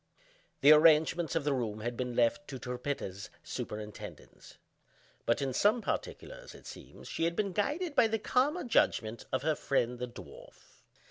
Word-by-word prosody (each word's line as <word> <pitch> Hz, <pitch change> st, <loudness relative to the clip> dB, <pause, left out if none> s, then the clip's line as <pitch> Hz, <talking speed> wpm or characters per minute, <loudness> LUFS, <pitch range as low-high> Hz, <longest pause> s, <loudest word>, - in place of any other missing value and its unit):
The 145 Hz, -, +8 dB
arrangements 160 Hz, +2 st, +5 dB
of 165 Hz, -, +1 dB
the 145 Hz, -1 st, +1 dB
room 110 Hz, -5 st, -2 dB
had 120 Hz, +2 st, -3 dB
been 125 Hz, 0 st, -3 dB
left 120 Hz, +5 st, +2 dB
to 135 Hz, -, -6 dB
Trippetta's 125 Hz, -6 st, -5 dB
superintendence; 105 Hz, -1 st, -8 dB, 0.7 s
but, 120 Hz, +4 st, +2 dB
in 135 Hz, -1 st, -2 dB
some 210 Hz, -, +3 dB
particulars, -, -, -5 dB
it -, -, -15 dB
seems, -, -, -11 dB
she 165 Hz, -, -1 dB
had 170 Hz, 0 st, 0 dB
been 200 Hz, -1 st, 0 dB
guided 295 Hz, -, -1 dB
by 235 Hz, -, +5 dB
the 220 Hz, 0 st, 0 dB
calmer 280 Hz, +10 st, +1 dB
judgment 115 Hz, -, +1 dB
of 130 Hz, -, -1 dB
her 155 Hz, -, +2 dB
friend 125 Hz, -4 st, -1 dB
the 125 Hz, -, -3 dB
dwarf. 120 Hz, -, -14 dB
145 Hz, 160 wpm, -31 LUFS, -, 0.7 s, The